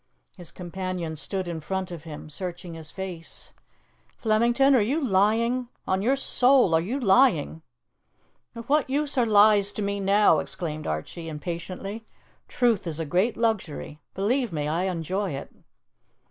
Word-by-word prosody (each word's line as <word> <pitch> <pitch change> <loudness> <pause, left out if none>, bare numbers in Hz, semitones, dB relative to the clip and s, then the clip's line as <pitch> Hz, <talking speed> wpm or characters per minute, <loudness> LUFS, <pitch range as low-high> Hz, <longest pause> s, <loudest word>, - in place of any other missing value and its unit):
His 175 -3 -10
companion 180 -2 -5
stood 185 +4 -4
in 170 -2 -4
front 190 +3 -3
of 170 -2 -8
him, 155 -1 -8
searching 175 +1 -5
his 160 -2 -7
face. 180 -3 -7 0.6
"Flemington, 235 +5 +3
are 255 - +5
you 260 +10 +1
lying? 230 +1 +2 0.2
On 190 0 +1
your 255 +6 +2
soul, 255 -6 +4
are 160 - +4
you 235 +11 -3
lying?" 195 - +3 0.9
"Of 230 0 -8
what 295 -1 +2
use 290 +1 0
are 245 -3 +2
lies 205 -1 +5
to 210 - -3
me 200 0 -2
now?" 200 +2 +4
exclaimed 155 -3 -4
Archie 120 - -4
impatiently. 180 +7 -6 0.4
"Truth 230 -7 +1
is 160 -1 -3
a 165 - -2
great 185 +10 +1
luxury; 200 -10 -2 0.2
believe 235 +4 0
me, 150 -2 -2
I 165 +4 0
enjoy 185 +1 -2
it." 135 - -7
190 Hz, 150 wpm, -26 LUFS, 170-230 Hz, 0.9 s, are